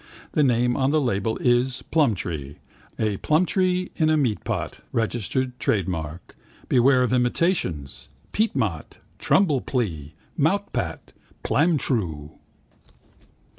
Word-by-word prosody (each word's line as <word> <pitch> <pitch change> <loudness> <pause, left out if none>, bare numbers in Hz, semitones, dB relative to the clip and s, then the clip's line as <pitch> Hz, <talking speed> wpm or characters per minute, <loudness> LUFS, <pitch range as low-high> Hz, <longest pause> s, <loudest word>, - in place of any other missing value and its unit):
The - - +1
name 125 -2 +2
on 135 -1 +1
the 155 +2 +3
label 110 -5 -1
is 125 +1 +1
Plumtree. 85 - 0 0.4
A 105 -3 0
plumtree 180 - +1
in 155 -2 +3
a 155 - +3
meatpot, 125 -8 -2
registered 125 +3 -1
trade 100 -6 +1
mark. 80 -1 -5 0.3
Beware 130 0 +4
of 125 -1 0
imitations. 120 - 0 0.2
Peatmot. 125 - -1 0.2
Trumplee. 120 - 0 0.3
Moutpat. - - -1 0.3
Plamtroo. 115 - +1
125 Hz, 95 wpm, -24 LUFS, 95-145 Hz, 0.4 s, Beware